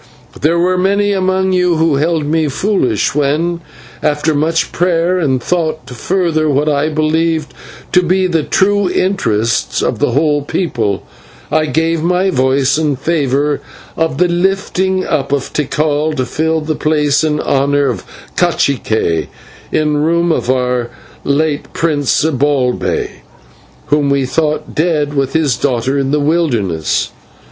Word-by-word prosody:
There 165 +3 +2
were 180 +1 +1
many 200 +2 +2
among 190 0 +1
you 180 -1 +2
who 160 -3 +2
held 160 +1 0
me 160 +1 +1
foolish 140 - 0
when, 155 +4 0 0.4
after 150 +1 +1
much 160 +3 0
prayer 175 +1 +1
and 135 -6 +1
thought, 160 +2 -2
to - - -10
further 160 +1 0
what 145 +2 +1
I 150 +1 +1
believed 160 0 0 0.4
to 180 - +4
be 185 +2 +1
the 165 -3 +1
true 200 +4 +1
interests 115 - 0
of - - -1
the - - +2
whole 145 +1 +2
people, 130 - -2 0.5
I 155 0 +2
gave 165 +1 0
my 180 +3 +1
voice 130 +1 +2
in 150 -3 0
favour 145 -1 0 0.3
of 160 -4 -1
the 180 - +3
lifting 190 +1 0
up 135 -2 -1
of 140 -2 -2
Tikal 150 +1 0
to 130 -3 -1
fill 160 +5 -1
the 155 +1 -2
place 150 -1 +1
and 150 -1 0
honour 140 +1 +1
of 115 -8 -3 0.3
/cacique/ 125 - 0 0.4
in 150 -1 +1
room 170 +3 +1
of 140 - -1
our 125 -2 0 0.3
late 145 +1 -1
prince, 145 -5 +1
Zibalbay, 140 -4 0 0.7
whom 145 -1 +2
we 140 -1 +1
thought 155 +3 -1
dead 150 -3 0
with 135 -1 -1
his 150 -6 +2
daughter 130 +1 0
in 135 -1 -1
the 150 +1 +1
wilderness. 120 - 0
155 Hz, 145 wpm, -15 LUFS, 140-170 Hz, 0.7 s, to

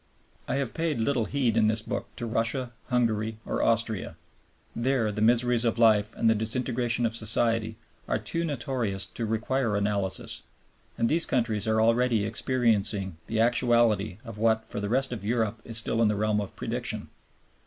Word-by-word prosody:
I - - -1
have 135 -4 -2
paid 160 -6 -1
little 120 0 +1
heed 125 -4 0
in 110 -1 +4
this 110 0 +1
book - - -4
to 120 - -5
Russia, 115 +2 -1 0.2
Hungary, 110 -3 0
or - - -2
Austria. 115 -3 0 0.6
There 120 -2 +1
the 105 +1 -4
miseries 120 +1 +3
of 115 -1 +1
life 110 -2 +4
and 115 - +1
the 110 - +6
disintegration 120 +2 0
of 115 - 0
society 115 0 +1 0.3
are - - +1
too 165 - -1
notorious 120 - -2
to 110 +4 -5
require 115 +1 0
analysis; 100 -2 -1 0.6
and 115 - +2
these 165 +5 +2
countries 115 -5 0
are 110 0 +2
already 115 -1 +2
experiencing 110 -5 0
the 110 - -1
actuality 115 -5 +2
of 115 -2 -9
what 110 0 +2
for - - -5
the 100 0 -3
rest 130 +3 +1
of 110 -5 -5
Europe 110 0 -1
is 115 -1 -2
still 115 0 +1
in 115 - +5
the 105 - +1
realm 105 0 +1
of 100 - -7
prediction. - - -2
115 Hz, 175 wpm, -27 LUFS, 110-120 Hz, 0.6 s, the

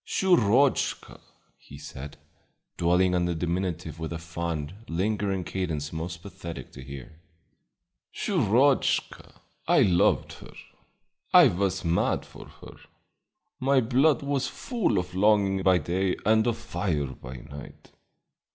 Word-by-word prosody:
"Shurochka!" 140 - +2 0.4
he 70 - -13
said, 70 0 -9 0.6
dwelling 90 +2 +2
on 90 -1 +1
the 85 -1 -1
diminutive 85 -1 -3
with 80 0 -5
a 85 - -3
fond, 85 -2 -4
lingering 95 +1 -1
cadence 80 -5 -3
most 85 +1 -5
pathetic 90 -4 -8
to - - -11
hear. 70 +3 -10 0.9
"Shurochka! 135 - +1 0.3
I - - +5
loved 85 -2 +2
her; - - -13 0.8
I 175 -7 +9
was 95 -1 -1
mad 85 +1 +1
for - - -13
her; - - -14 0.8
my 135 +1 +3
blood 135 +6 +2
was 140 -1 -1
full 240 -5 -1
of 90 0 -3
longing 100 0 +3
by 95 -1 +4
day 90 +2 -1
and 110 +2 +3
of 120 - 0
fire 100 -10 -2
by 65 -1 -9
night. 70 +3 -12
90 Hz, 125 wpm, -26 LUFS, 85-110 Hz, 0.9 s, I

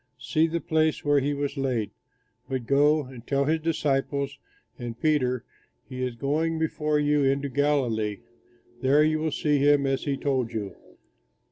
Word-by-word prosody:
See 155 +6 +1
the 170 +1 -2
place 160 -1 0
where 145 -1 +4
he 145 +2 -1
was 140 0 -3
laid! 125 -6 -1 0.6
But 130 -3 -3
go 145 +3 +3
and 125 -2 -12
tell 140 0 +1
his 160 +2 +1
disciples 140 -3 -1 0.4
and 120 -1 -6
Peter, 125 -6 +1 0.4
'He 130 0 -6
is 125 -2 -2
going 155 +6 0
before 155 -1 0
you 145 0 +2
into 140 +1 +1
Galilee; 125 -7 0 0.6
there 140 +3 +4
you 155 0 +2
will 160 0 -1
see 150 0 +1
him, 145 0 +4
as 135 0 -1
he 140 -2 -1
told 130 -5 -1
you.'" 105 -3 -4
140 Hz, 160 wpm, -26 LUFS, 130-150 Hz, 0.6 s, where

